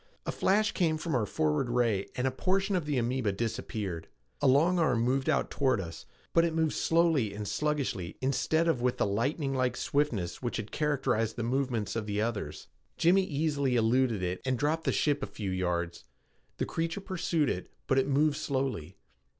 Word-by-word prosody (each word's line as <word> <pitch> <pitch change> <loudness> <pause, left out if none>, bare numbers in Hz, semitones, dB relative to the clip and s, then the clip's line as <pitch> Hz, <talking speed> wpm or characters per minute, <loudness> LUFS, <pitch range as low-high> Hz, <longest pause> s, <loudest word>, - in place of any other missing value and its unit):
A - - -1
flash 210 +2 +2
came 160 -4 +1
from 160 +1 -3
our 115 -5 +1
forward 80 - 0
ray 115 -5 +1
and 125 - -1
a 130 - +2
portion 195 +8 0
of 175 -4 0
the 145 -3 0
amoeba 120 -2 0
disappeared. 100 -4 -3 0.3
A 145 - +4
long 165 +7 +4
arm 130 -8 +2
moved 130 +4 +1
out 145 - +1
toward 130 -5 +2
us, 85 -3 -7 0.3
but 165 - +5
it 165 -1 0
moved 160 -1 +1
slowly 160 -11 +2
and 105 0 -5
sluggishly 140 - -2
instead 160 +5 +1
of 135 -7 +1
with 125 0 +1
the - - +2
lightninglike 130 +4 0
swiftness 110 -12 -1
which 120 -2 -2
had 110 -1 -5
characterized 135 -7 0
the 120 - -3
movements 120 -3 -1
of 110 -2 -2
the 105 0 -1
others. 105 -9 -3 0.3
Jimmy 185 +3 +4
easily 145 -4 0
eluded 115 -2 +2
it 90 +1 -2
and 130 -1 0
dropped 155 +4 0
the - - +2
ship 145 -1 +1
a - - -2
few 100 -3 -4
yards. 85 -2 -2 0.5
The - - 0
creature 165 +3 -2
pursued 170 -5 0
it, - - -3 0.2
but 135 - +3
it 135 - +1
moved 145 +1 +2
slowly. 130 - -2
130 Hz, 185 wpm, -30 LUFS, 110-150 Hz, 0.5 s, but